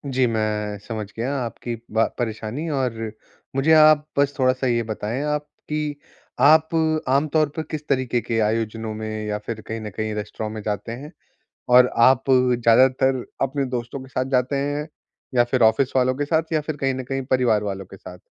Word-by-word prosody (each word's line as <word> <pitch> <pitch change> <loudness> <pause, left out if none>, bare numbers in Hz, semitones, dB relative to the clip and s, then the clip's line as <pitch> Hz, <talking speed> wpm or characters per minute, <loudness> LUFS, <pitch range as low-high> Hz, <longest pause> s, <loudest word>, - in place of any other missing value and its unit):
जी 130 -1 +4
मैं 105 -2 -1
समझ 110 +1 -5
गया 125 +5 -1
आपकी 120 0 -5 0.2
बा 110 +1 +3
परेशानी 115 +6 -3
और 135 -5 0 0.6
मुझे 135 +4 +2
आप 155 -1 +6
बस 140 0 +2
थोड़ा-सा 130 0 +2
ये 120 -1 +1
बताएँ 110 +3 -3
आप 150 0 -2 0.2
कि, 150 -1 -2 0.4
आप 155 +4 +6 0.4
आमतौर 150 +3 +2
पर 160 - -2
किस 150 -1 -5
तरीके 130 -3 0
के 115 -1 -1
आयोजनों 110 0 -2
में 110 0 -5
या 105 0 -1
फिर 115 -2 -5
कहीं 110 0 -4
न 105 - -5
कहीं 110 -1 -2
रेस्टोरेंट 105 +1 -5
में 110 - -5
जाते 105 +2 -3
हैं? 140 +6 -8 0.6
और 125 0 +7
आप 130 +3 +4
ज़्यादातर 125 +1 +3 0.2
अपने 135 +1 0
दोस्तों 120 +3 -5
के 130 - -12
साथ 130 0 -1
जाते 130 +1 +1
हैं 145 +2 -2 0.5
या 120 -1 +5
फिर 120 +1 0
ऑफ़िस 120 +4 +3
वालों 130 0 +3
के 145 - -1
साथ? 160 +2 +1
या 155 - +2
फिर 150 0 -5
कहीं 135 -2 0
न 130 0 -5
कहीं 135 +1 -3
परिवार 125 -5 +3
वालों 100 -2 -4
के 95 - -12
साथ? 90 -1 -11
125 Hz, 185 wpm, -23 LUFS, 110-140 Hz, 0.6 s, और